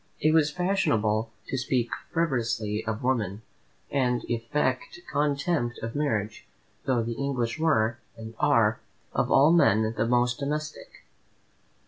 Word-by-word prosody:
It 155 - +3
was 155 -2 +4
fashionable 115 - 0 0.2
to 135 - -1
speak 125 -2 0 0.2
frivolously 115 -9 -1
of 110 +1 -3
women, 110 -5 -1 0.5
and 125 -3 +1
affect 130 +5 -1
contempt 145 -3 0
of 115 0 -4
marriage, 110 -8 -2 0.4
though 125 -3 +1
the 115 +1 -3
English 125 -1 -1
were, 120 -7 +2 0.2
and 110 0 -8
are, - - +3 0.3
of - - 0
all 145 +4 +6
men 110 -9 +4
the 110 +1 0
most 125 +1 +2
domestic. 150 +2 -5
125 Hz, 125 wpm, -27 LUFS, 110-145 Hz, 0.5 s, all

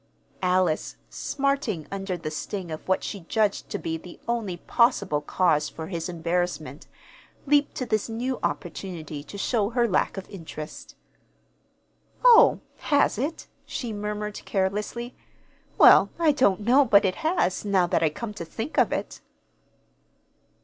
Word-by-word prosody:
Alice, 180 -3 +1 0.2
smarting 275 - -1
under 195 -2 -3
the 155 -2 -5
sting 175 +2 -5
of 155 - -7
what 190 - +1
she 200 - -4
judged 205 +4 -1
to - - -3
be 160 0 -3
the 175 +1 -12
only 225 -7 -2
possible 200 - +2
cause 150 -1 +1
for 160 - -7
his 170 0 -4
embarrassment, 165 -4 -3 0.6
leaped 290 0 +2
to 255 - -3
this 215 -1 -1
new 245 +3 -2
opportunity 165 -4 -4
to 200 - -10
show 210 0 0
her 240 0 +2
lack 195 - 0
of 195 - -6
interest. 160 -5 -9 1.3
"Oh, 475 -2 +7 0.2
has 285 -7 +2
it?" 295 +6 -3 0.2
she 235 -4 -5
murmured 210 0 -4
carelessly. 210 +5 -2 0.6
"Well, - - +8
I 330 -3 +4
don't 215 -9 +2
know 250 +7 +5
but 205 -6 +5
it 185 - 0
has, 315 - 0
now 195 -3 +2
that 175 - +1
I 160 - +3
come 210 +8 -6
to 205 - -6
think 225 - -3
of - - +3
it." - - -4
200 Hz, 145 wpm, -25 LUFS, 170-235 Hz, 1.3 s, Well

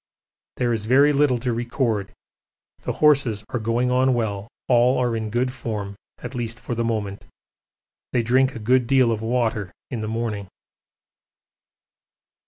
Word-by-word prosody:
There 120 -1 +1
is 110 -2 -2
very 140 +4 +5
little 140 -3 +3
to 120 0 -2
record 115 -4 -1 0.7
the - - -3
horses 135 -8 +3
are 120 - -2
going 115 +3 0
on 130 0 +3
well, 105 -3 -2 0.2
all 125 +1 +4
are 120 -2 +1
in 110 -1 -3
good 125 +3 0
form, 105 -6 -5 0.2
at - - -8
least 115 -2 -4
for - - -5
the 115 0 -1
moment. 105 -3 -3 0.8
They 120 - +1
drink 130 +3 +2
a - - -4
good 120 +2 +2
deal 130 -3 +4
of 110 -1 -2
water 110 -4 -1 0.2
in 120 -4 -3
the 110 - -3
morning. 110 -3 -3
120 Hz, 155 wpm, -23 LUFS, 110-125 Hz, 0.8 s, very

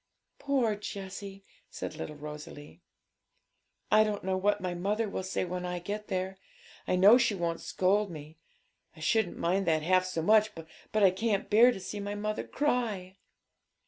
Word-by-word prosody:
'Poor 260 -6 +1
Jessie!' 195 -1 -7 0.2
said - - -6
little 150 - -6
Rosalie. 150 0 -10 1.1
'I 215 0 +7
don't 210 -1 -2
know 190 0 0
what 200 +2 +1
my 180 -1 -3
mother 205 +5 -1
will 195 - -3
say 185 0 -2
when 180 0 -4
I 180 0 -3
get 205 +4 -5
there. 190 0 -3 0.5
I - - +2
know 200 +7 +7
she 235 -4 +2
won't 170 -2 -2
scold 200 +2 +1
mo; 155 -2 -9 0.6
I - - -15
shouldn't 195 +4 +1
mind 185 +2 0
that 155 -2 +2
half 185 +2 +3
so 175 -3 -3
much, 215 +2 +4
but 165 +6 -4
I 190 - +7
can't 205 +2 -1
bear 235 +4 +7
to 215 - -6
see 200 +2 -6
my 205 0 -4
mother 215 +1 -2
cry.' 220 -10 -1
195 Hz, 170 wpm, -30 LUFS, 180-210 Hz, 1.1 s, I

